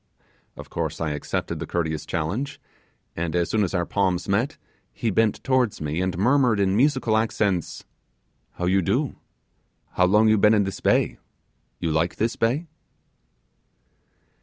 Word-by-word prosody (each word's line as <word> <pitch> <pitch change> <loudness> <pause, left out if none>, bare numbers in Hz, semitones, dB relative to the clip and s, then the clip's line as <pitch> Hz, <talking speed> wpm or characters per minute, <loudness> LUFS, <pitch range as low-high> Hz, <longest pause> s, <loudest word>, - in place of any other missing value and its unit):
Of - - -10
course - - -3
I 80 -2 -1
accepted 75 -1 -3
the - - -5
courteous 80 -3 -2
challenge, 90 - -3 0.6
and, 85 0 -3
as 85 -1 0
soon 110 -1 +2
as 95 0 -2
our 90 -1 +1
palms 95 -3 0
met, 105 +8 0 0.3
he 115 - -2
bent 110 +2 +1
towards 130 -5 +1
me, 75 +3 -2
and 95 -2 -1
murmured 120 +1 +3
in 95 -1 +2
musical 130 -2 +2
accents 105 -5 -1 0.7
'How 90 - -3
you 95 +2 +3
do?' 85 - -1 0.7
'How 90 - +3
long 105 +4 +4
you 110 -1 +4
been 105 +2 +5
in 105 - +3
this 95 0 -4
bay?' - - +1 0.6
'You 85 - -1
like 80 +3 0
this 115 +2 -1
bay? 125 +9 0
100 Hz, 155 wpm, -24 LUFS, 85-110 Hz, 0.7 s, been